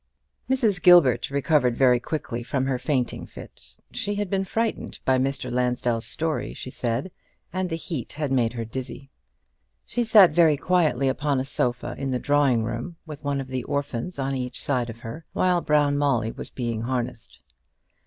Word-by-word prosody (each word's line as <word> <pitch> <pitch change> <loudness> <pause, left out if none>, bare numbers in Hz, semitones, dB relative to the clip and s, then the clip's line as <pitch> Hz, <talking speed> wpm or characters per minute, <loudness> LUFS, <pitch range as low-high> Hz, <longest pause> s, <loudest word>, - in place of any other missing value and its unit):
Mrs. 225 -8 +2
Gilbert 140 -10 +6
recovered 140 -3 +2
very 125 -2 +5
quickly 120 -3 -4
from 130 +2 -1
her 130 -2 -1
fainting 130 -4 -1
fit. - - -12 0.3
She 205 0 -2
had 205 -2 -3
been 195 -1 0
frightened 225 +3 -2
by 130 -1 +3
Mr. 130 -1 -1
Lansdell's 125 -2 0
story, 160 -1 -2
she 130 - -7
said, 125 +9 -2 0.4
and 185 0 -1
the 165 - -2
heat 165 -5 -5
had 150 -2 -3
made 120 -3 +2
her 115 -2 -4
dizzy. 130 +3 -7 0.7
She 240 - -1
sat 215 -5 +7
very 160 -4 +4
quietly 155 -6 +2
upon 140 +1 0
a 130 - -2
sofa, 120 -2 -1
in 135 -1 -2
the 130 - 0
drawing 140 -4 +2
room, 120 +9 -4
with 150 -2 -9
one 140 -1 -1
of 135 -1 -6
the 130 -1 -3
orphans 140 +3 -3
on 135 0 -1
each 125 -1 -3
side 125 -4 -1
of 115 0 -9
her, 130 +9 -7
while 180 -1 +2
Brown 145 -2 +2
Molly 125 -6 +1
was - - -8
being 115 -3 -3
harnessed. 120 -1 -4
135 Hz, 175 wpm, -25 LUFS, 125-160 Hz, 0.7 s, sat